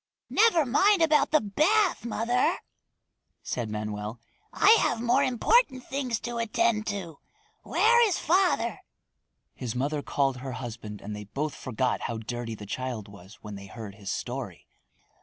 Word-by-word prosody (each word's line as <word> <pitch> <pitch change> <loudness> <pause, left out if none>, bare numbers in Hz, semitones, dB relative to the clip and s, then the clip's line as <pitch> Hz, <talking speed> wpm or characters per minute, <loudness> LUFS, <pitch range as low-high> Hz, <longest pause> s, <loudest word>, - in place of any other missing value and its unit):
"Never 405 -8 +4
mind 375 - +4
about 310 -2 +4
the 310 - +4
bath, 330 - +2
mother," 245 +8 +1 0.9
said 120 -3 -3
Manoel. 105 +1 -4 0.3
"I 410 - +5
have - - +1
more 240 +1 +3
important 260 - +2
things 260 -4 -2
to 240 -1 -4
attend 230 -1 +1
to. 185 -8 -5 0.4
Where 475 +1 +4
is 365 - 0
father?" 365 +3 +1 0.7
His 125 -3 -5
mother 145 +4 -1
called 135 -2 0
her 130 +1 -6
husband 115 -4 -7
and 105 +1 -6
they 105 0 -7
both 145 +8 -3
forgot 130 0 -2
how 115 - -3
dirty 115 0 -5
the 105 - -10
child 120 -1 -4
was 100 +1 -14
when 105 -1 -7
they 100 0 -9
heard 110 -1 -8
his 100 -1 -8
story. - - -5
150 Hz, 150 wpm, -27 LUFS, -, 0.9 s, I